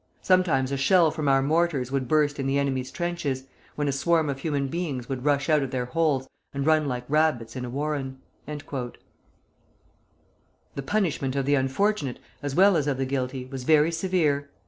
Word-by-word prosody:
Sometimes 165 -8 +3
a 140 - 0
shell 165 +3 +4
from 155 -2 -3
our 135 -1 +4
mortars 150 -4 +1
would 135 -2 -1
burst 145 0 +2
in 135 - -1
the 135 +1 +1
enemy's 130 -2 -1
trenches, 170 -7 -3 0.3
when 145 -1 -1
a - - +2
swarm 155 +2 +1
of 135 - -6
human 140 -2 -1
beings 140 -5 -3
would 130 -1 -4
rush 145 -1 +2
out 155 -2 +4
of 135 - -2
their 125 -1 -2
holes 140 -1 0 0.3
and 140 0 -1
run 155 -1 +3
like 125 -2 -3
rabbits 145 -7 +1
in 125 -1 -4
a - - -6
warren." 140 0 -3 0.3
The 145 -4 -5 1.9
punishment 145 -7 0
of 135 -1 0
the 145 - +2
unfortunate, 140 +2 0 0.2
as 145 -1 -3
well 195 +1 +6
as 150 -2 0
of 140 -2 0
the 135 - -1
guilty, 130 -1 -3
was 130 -1 -7
very 155 +3 +4
severe. 165 -5 0
140 Hz, 185 wpm, -26 LUFS, 130-155 Hz, 1.9 s, well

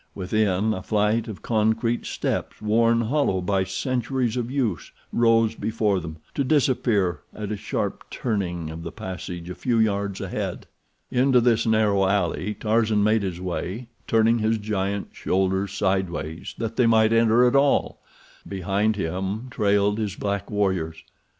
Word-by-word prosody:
Within, 105 +1 +1
a 95 - -4
flight 105 +3 +1
of 110 -4 -8
concrete 115 +1 +1
steps, - - -3
worn 115 +2 +3
hollow 120 -5 +1
by 95 +1 +1
centuries 125 +4 -1
of 120 -1 -2
use, 120 - -2 0.2
rose 115 -1 +3
before 110 -3 0
them, 80 -2 -7 0.2
to 140 - 0
disappear 120 - +2 0.2
at 105 -1 -5
a - - -1
sharp - - -4
turning 90 -8 -2
of 80 +1 -7
the - - -6
passage 90 -2 -6
a 90 - -5
few 120 +4 -1
yards 100 -3 0
ahead. - - -4 0.5
Into 130 0 +4
this 115 -1 +2
narrow 105 -3 +3
alley 100 +1 0
Tarzan 110 -1 +2
made 110 +1 +3
his 90 -3 -3
way, 95 +6 -4 0.2
turning 115 +1 +3
his 110 +1 +1
giant 100 -2 -2
shoulders 95 +1 0
sideways 95 -5 -2
that 115 -1 -4
they 125 -2 +4
might 110 -1 +4
enter 115 +1 +5
at 125 - +3
all. 140 0 +2 0.5
Behind 100 +3 0
him 95 +6 -3
trailed 105 -1 +2
his 105 -3 -2
black 100 -1 -3
warriors. 95 -6 -1
105 Hz, 150 wpm, -24 LUFS, 95-115 Hz, 0.5 s, enter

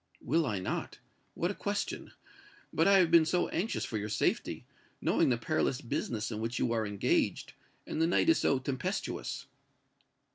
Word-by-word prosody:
"Will 160 +4 +1
I 105 - -1
not? 90 - -3 0.4
What - - 0
a - - -4
question! - - -3 0.6
But 165 - +3
I 200 0 +7
have 175 -3 +4
been 170 -1 +8
so 175 +3 +1
anxious 205 +7 -1
for 110 - -3
your 105 +1 -4
safety, - - -1 0.3
knowing - - +2
the 120 - +2
perilous 135 0 0
business 115 -2 -3
in 110 - -3
which 115 +2 -2
you 120 - +1
are 110 -2 0
engaged; 100 -1 0 0.3
and 160 - -3
the 165 - +4
night 175 - +2
is 330 - +5
so 140 - +3
tempestuous." 130 0 -3
130 Hz, 175 wpm, -31 LUFS, 110-165 Hz, 0.6 s, been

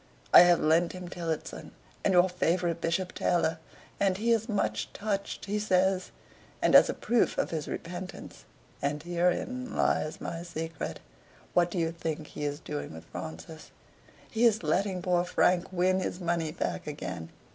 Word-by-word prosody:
I - - +12
have 175 -1 +7
lent 165 +2 +3
him 180 -1 -7
'Tillotson' 165 -3 -5 0.3
and 195 - +3
your 180 +1 +6
favorite 175 -1 0
'Bishop 180 +2 -1
Taylor,' 165 -2 +1 0.4
and 195 -2 +2
he 230 +3 +1
is 225 0 +1
much 205 -2 -1
touched, 200 -1 -3
he 205 +1 -1
says; 190 -2 +2 0.5
and - - +2
as - - +8
a - - -1
proof 240 0 +1
of - - 0
his 155 -3 -3
repentance 180 +2 -7 0.4
(and 145 +1 -1
herein 180 +9 -1
lies 155 - +1
my 165 0 -5
secret) 165 -2 -5 0.5
what 175 0 +4
do 175 - -5
you 165 -1 +1
think 160 -2 -4
he 150 - -6
is 145 0 -2
doing 145 - -5
with 80 - -10
Francis? 85 - -8 0.6
He 225 +1 0
is 220 -5 +4
letting 185 +3 0
poor 175 -1 +2
Frank 180 0 +2
win 185 +1 +2
his 180 -1 -3
money 170 -3 -1
back - - -3
again. 90 - -5
175 Hz, 165 wpm, -29 LUFS, 160-190 Hz, 0.6 s, I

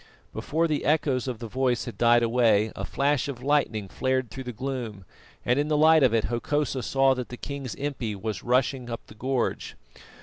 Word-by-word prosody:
Before 165 +3 0
the 150 -2 -1
echoes 140 -4 +1
of 125 -3 -3
the 115 - -7
voice 125 +1 0
had 120 - -7
died 120 0 +4
away, 115 -3 +3
a - - -4
flash 145 +1 0
of 130 -3 -6
lightning 135 -8 +1
flared 130 +3 -1
through 130 -1 -7
the 125 - -4
gloom, 120 -5 -5 0.4
and 125 +3 +2
in 145 - +1
the 150 -1 +1
light 160 +1 +6
of 130 -4 +5
it 115 -1 +2
Hokosa 135 +3 -1
saw 135 +1 +3
that 125 -2 -5
the 125 - -7
king's 140 -3 -6
impi 135 -7 -3
was 110 +2 -4
rushing 125 0 +1
up 115 - -6
the - - -14
gorge. 125 +3 -2
130 Hz, 200 wpm, -26 LUFS, 115-140 Hz, 0.4 s, light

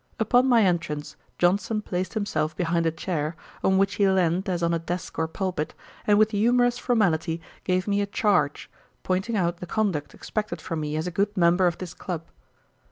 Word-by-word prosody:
Upon 245 +4 +4
my 235 -3 +5
entrance, 170 -5 -1 0.2
Johnson 200 +4 +1
placed 185 +3 -3
himself 155 -7 -1
behind 170 -2 +1
a - - +2
chair, 160 -2 -3 0.3
on 190 0 +3
which 195 0 +2
he 200 - +5
leaned 185 +1 +1
as 175 -2 -1
on 170 0 +2
a 165 - +1
desk 175 +1 -5
or 160 - +1
pulpit, 180 -2 -3 0.3
and 205 -1 +5
with 215 +1 +4
humorous 245 +3 +3
formality 175 -10 +1 0.3
gave 185 +1 +1
me 205 0 +2
a 200 - -1
Charge, 200 -8 +1 0.4
pointing 190 +5 -1
out 175 -2 0
the 180 - -8
conduct 190 -7 -1
expected 210 -6 -4
from 165 0 -4
me 150 0 -3
as 155 +2 -1
a 180 - -3
good 205 +3 -1
member 175 +1 +4
of 175 - -1
this 180 -2 -7
club. 170 -3 -5
185 Hz, 190 wpm, -25 LUFS, 165-205 Hz, 0.4 s, my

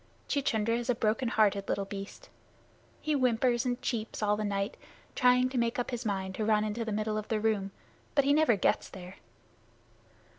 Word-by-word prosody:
Chuchundra 230 -5 +1
is 240 +1 -6
a 245 - +3
broken 225 +3 0
hearted 205 -3 +2
little 200 - 0
beast. 200 - -8 0.7
He 310 - 0
whimpers 250 -2 +2
and 245 0 -1
cheeps 220 -2 -3
all 210 0 +3
the 215 - -3
night, 200 0 -1 0.4
trying 250 -1 +4
to 255 -1 -1
make 235 0 0
up 245 - -2
his 240 -1 -3
mind 190 -2 -2
to 215 - -3
run 215 0 +3
into 215 +2 -2
the 225 - -4
middle 215 0 -1
of 215 - -8
the 220 - 0
room. 210 -3 0 0.5
But 280 -2 +4
he 285 - +4
never 305 -6 +4
gets 195 - +1
there. 185 0 -10
220 Hz, 190 wpm, -30 LUFS, 210-245 Hz, 0.7 s, trying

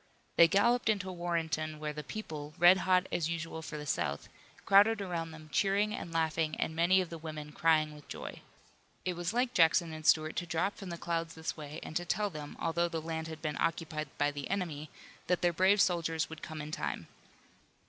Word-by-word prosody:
They 170 - +8
galloped 235 +6 +3
into 200 -3 0
Warrenton 165 -3 -2
where 150 0 -4
the 150 0 -6
people, 150 -5 -6
red 175 +2 +8
hot 185 0 +5
as 165 -2 0
usual 165 -1 -4
for 155 -1 -6
the 150 - -6
South, 85 - -2 0.4
crowded 205 +3 +6
around 175 -4 -3
them 155 -1 -11
cheering 205 +2 +2
and 170 - -5
laughing 160 -1 0
and 160 - -1
many 175 +3 +4
of 180 - -5
the 165 - -6
women 155 -2 -7
crying 155 -1 +2
with 150 -1 -14
joy. - - -7 0.6
It 180 - 0
was 175 +1 -2
like 245 +2 +1
Jackson 165 -2 +4
and 155 0 -7
Stuart 155 0 +3
to 175 - -2
drop 170 +5 0
from 195 - -8
the 170 - -5
clouds 165 -1 -2
this 160 0 -4
way 150 0 -7
and 160 - -8
to 175 - -2
tell 200 +4 0
them, 150 -2 -8
although 170 +1 +1
the 165 - -2
land 160 0 -4
had 160 0 -8
been 150 -2 -2
occupied 160 -2 -1
by 145 0 +2
the 145 -1 -6
enemy, 160 -6 -3 0.4
that 180 - +1
their 175 -1 +3
brave 190 +4 +4
soldiers 165 -4 +1
would 160 - -8
come 155 -1 -6
in 150 - -7
time. - - -3
165 Hz, 210 wpm, -32 LUFS, 155-180 Hz, 0.6 s, They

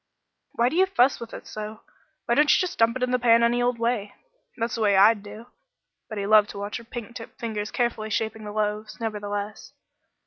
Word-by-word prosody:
"Why 235 +1 +2
do 300 - -5
you 380 +2 +4
fuss 260 -8 +3
with 235 -1 -8
it - - -9
so? 215 0 -7 0.4
Why 235 - +1
don't 295 +4 +4
you - - +6
just 365 -2 -2
dump 230 +2 +3
it 255 - -3
in 250 - 0
the 250 - +2
pan 235 -1 +5
any 240 +1 +2
old 245 0 +1
way? 230 -3 -1 0.4
That's 230 -1 -2
the 230 - -3
way 200 -2 +3
I'd 210 +2 +6
do." 210 +3 -10 0.6
But 215 - -6
he 200 - -2
loved 210 0 +5
to - - -8
watch 205 +1 -4
her 235 - -11
pink 235 -1 -8
tipped 230 - -10
fingers 215 -2 -3
carefully 235 -3 -1
shaping 220 +1 -2
the 210 - -6
loaves, 215 +1 -3
nevertheless. 205 -2 -5
225 Hz, 220 wpm, -25 LUFS, 210-240 Hz, 0.6 s, you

